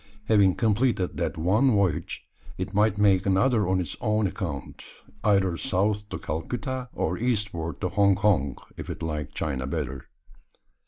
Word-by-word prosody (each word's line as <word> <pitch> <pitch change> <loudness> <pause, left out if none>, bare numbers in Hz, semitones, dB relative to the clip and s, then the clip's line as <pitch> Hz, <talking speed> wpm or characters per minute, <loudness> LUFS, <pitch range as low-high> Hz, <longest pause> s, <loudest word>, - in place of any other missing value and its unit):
Having 100 -4 +4
completed 110 -4 +1
that - - -2
one 100 +11 +3
voyage, 100 - 0 0.3
it - - -4
might 105 0 +3
make 100 -2 +3
another 105 +3 +3
on 95 0 +2
its 85 -5 -2
own 110 -2 +1
account 85 - -5 0.4
either 100 -5 +3
south 105 -1 0
to - - -4
Calcutta 125 - -4
or 90 +3 -2
eastward 105 -9 -1
to 90 - 0
Hong 100 +1 +4
Kong, 90 -10 +1 0.2
if - - -7
it - - -5
liked 75 -2 -4
China 65 -4 -2
better. 70 -3 -4
100 Hz, 150 wpm, -26 LUFS, 85-105 Hz, 0.4 s, Having